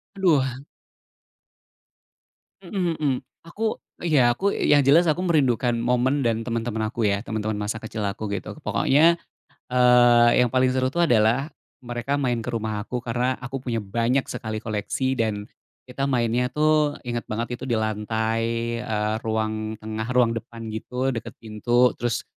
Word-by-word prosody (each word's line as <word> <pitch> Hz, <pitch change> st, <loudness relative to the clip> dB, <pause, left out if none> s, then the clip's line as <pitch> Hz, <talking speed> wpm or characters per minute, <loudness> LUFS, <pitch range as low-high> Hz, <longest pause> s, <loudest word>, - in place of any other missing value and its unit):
Aduh. 170 Hz, -9 st, +3 dB, 2.2 s
Mhm 175 Hz, -3 st, -2 dB
mhm. 145 Hz, -3 st, +1 dB, 0.3 s
Aku 220 Hz, +5 st, -2 dB, 0.3 s
ya 130 Hz, -8 st, +4 dB
aku 200 Hz, +1 st, +1 dB
yang 145 Hz, -1 st, +3 dB
jelas 160 Hz, +6 st, +5 dB
aku 160 Hz, +4 st, +1 dB
merindukan 130 Hz, -8 st, +2 dB
momen 125 Hz, +4 st, +1 dB
dan 115 Hz, -1 st, +1 dB
teman-teman 115 Hz, -2 st, -2 dB
aku 115 Hz, -3 st, -1 dB
ya, 100 Hz, 0 st, 0 dB
teman-teman 110 Hz, -1 st, -3 dB
masa 105 Hz, +2 st, -3 dB
kecil 110 Hz, -1 st, -5 dB
aku 100 Hz, +2 st, -3 dB
gitu. 100 Hz, -, -5 dB
Pokoknya, 165 Hz, +5 st, +3 dB, 0.5 s
eee, 120 Hz, -1 st, +6 dB
yang 120 Hz, -, 0 dB
paling 130 Hz, 0 st, +2 dB
seru 130 Hz, 0 st, +1 dB
tuh 170 Hz, +4 st, +1 dB
adalah 120 Hz, +1 st, +3 dB, 0.4 s
mereka 120 Hz, +3 st, -2 dB
main 125 Hz, -4 st, 0 dB
ke 125 Hz, -, -5 dB
rumah 110 Hz, -2 st, -2 dB
aku 125 Hz, +2 st, -5 dB
karena 125 Hz, +2 st, 0 dB
aku 130 Hz, +1 st, -6 dB
punya 120 Hz, -3 st, -2 dB
banyak 120 Hz, +6 st, 0 dB
sekali 110 Hz, -1 st, -5 dB
koleksi, 110 Hz, +5 st, -1 dB
dan 105 Hz, -2 st, -1 dB, 0.4 s
kita 135 Hz, +2 st, -3 dB
mainnya 120 Hz, 0 st, +1 dB
tuh, 150 Hz, +1 st, +2 dB
ingat 120 Hz, -1 st, -2 dB
banget 115 Hz, +3 st, -3 dB
itu -, -, -9 dB
di 115 Hz, -, +2 dB
lantai, 110 Hz, +1 st, -1 dB, 0.4 s
eee, 105 Hz, 0 st, -1 dB
ruang 110 Hz, 0 st, -2 dB
tengah 110 Hz, +1 st, -5 dB
ruang 120 Hz, -2 st, +4 dB
depan 115 Hz, 0 st, -7 dB
gitu, 125 Hz, +4 st, -2 dB
deket 115 Hz, -, -6 dB
pintu 120 Hz, +3 st, +1 dB
terus 120 Hz, 0 st, -1 dB
120 Hz, 150 wpm, -24 LUFS, 110-130 Hz, 2.2 s, eee